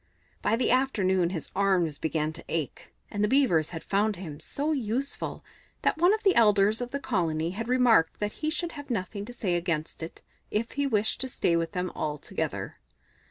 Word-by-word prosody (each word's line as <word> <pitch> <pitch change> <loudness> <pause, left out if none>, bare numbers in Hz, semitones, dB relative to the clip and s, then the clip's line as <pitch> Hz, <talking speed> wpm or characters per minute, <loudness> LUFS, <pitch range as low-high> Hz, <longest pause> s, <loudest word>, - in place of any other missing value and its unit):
By - - +2
the 245 - +1
afternoon 190 -9 +2
his 170 -4 -5
arms 185 -6 +2
began 155 -1 -1
to 170 - -10
ache, 155 -6 -3 0.2
and 205 0 -1
the - - +4
Beavers 215 - +3
had 165 -2 -6
found 205 +2 +1
him 160 -5 -7
so 290 - -2
useful 265 0 -2 0.4
that - - +2
one 350 +3 +6
of 435 +1 0
the 390 -2 +5
elders 210 0 +4
of 245 - -3
the 280 - -3
colony 165 - 0
had 225 +5 -4
remarked 245 -9 +4
that 210 0 -1
he 310 - +1
should 340 +1 -2
have 290 -3 -9
nothing 200 -2 -3
to 245 - -8
say 195 -7 -1
against 170 -3 -2
it 160 - -8 0.3
if 225 +2 -1
he 285 0 0
wished 220 -3 +1
to 260 - -2
stay 170 -7 +1
with 165 +2 -1
them 180 -1 -2
altogether. 150 -1 -3
205 Hz, 195 wpm, -28 LUFS, 170-250 Hz, 0.4 s, one